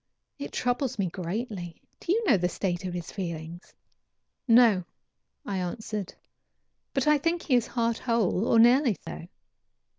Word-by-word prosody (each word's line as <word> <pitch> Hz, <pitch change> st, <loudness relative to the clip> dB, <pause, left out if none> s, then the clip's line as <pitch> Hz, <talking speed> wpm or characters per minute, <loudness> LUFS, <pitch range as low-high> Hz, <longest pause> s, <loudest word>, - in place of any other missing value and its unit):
It 285 Hz, -, -6 dB
troubles 250 Hz, 0 st, -1 dB
me 200 Hz, -, 0 dB
greatly. 185 Hz, -1 st, -5 dB, 0.2 s
Do 340 Hz, -, -3 dB
you 450 Hz, +4 st, +1 dB
know 280 Hz, -, +5 dB
the 180 Hz, -2 st, +1 dB
state 180 Hz, -1 st, -2 dB
of 180 Hz, -, -4 dB
his 175 Hz, -2 st, -6 dB
feelings?" 170 Hz, -2 st, -6 dB, 0.8 s
"No," 230 Hz, -5 st, +6 dB, 0.6 s
I 195 Hz, -2 st, -2 dB
answered, 210 Hz, +1 st, -4 dB, 0.8 s
"but 270 Hz, -2 st, 0 dB
I 300 Hz, -1 st, +4 dB
think 330 Hz, +3 st, 0 dB
he 275 Hz, -, -1 dB
is 240 Hz, -2 st, +3 dB
heart 230 Hz, -2 st, -1 dB
whole, 230 Hz, -3 st, +1 dB
or 230 Hz, -, +4 dB
nearly 240 Hz, 0 st, +5 dB
so. 165 Hz, -, -7 dB
220 Hz, 150 wpm, -27 LUFS, 180-250 Hz, 0.8 s, No